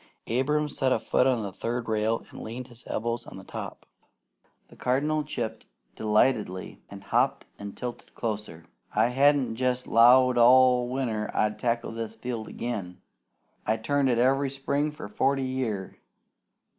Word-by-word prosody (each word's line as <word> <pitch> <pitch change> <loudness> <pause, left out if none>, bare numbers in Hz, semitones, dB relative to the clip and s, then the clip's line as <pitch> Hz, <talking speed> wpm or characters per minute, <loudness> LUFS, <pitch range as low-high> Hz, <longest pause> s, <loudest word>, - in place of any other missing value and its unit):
Abram 150 +5 +1
set 135 -2 0
a - - +4
foot 130 - +2
on 125 -4 +1
the 100 - -4
third 120 +3 -3
rail 110 +1 0
and - - -9
leaned 125 +3 -7
his 120 -1 -13
elbows 115 +1 -3
on - - -10
the - - -10
top. - - -7 0.8
The - - -16
Cardinal 150 +5 0
chipped 115 -6 -5 0.3
delightedly 105 -3 0
and 100 -1 -10
hopped - - +1
and 100 -1 -8
tilted 125 -1 -7
closer. 105 -8 -4 0.3
"I 120 - +4
hadn't 135 -3 +3
jest 125 0 0
'lowed 125 +2 +6
all 125 0 +6
winter 115 -5 -2
I'd 105 0 +1
tackle 115 -1 -1
this 115 -1 -5
field 115 -1 -5
again. 100 -7 -5 0.7
I've 110 +1 0
turned 145 +1 +2
it 120 - +2
every 135 +3 +3
spring 140 +2 -1
for 150 - -8
forty 135 +6 +1
year. 120 -7 -3
120 Hz, 155 wpm, -27 LUFS, 110-130 Hz, 0.8 s, lowed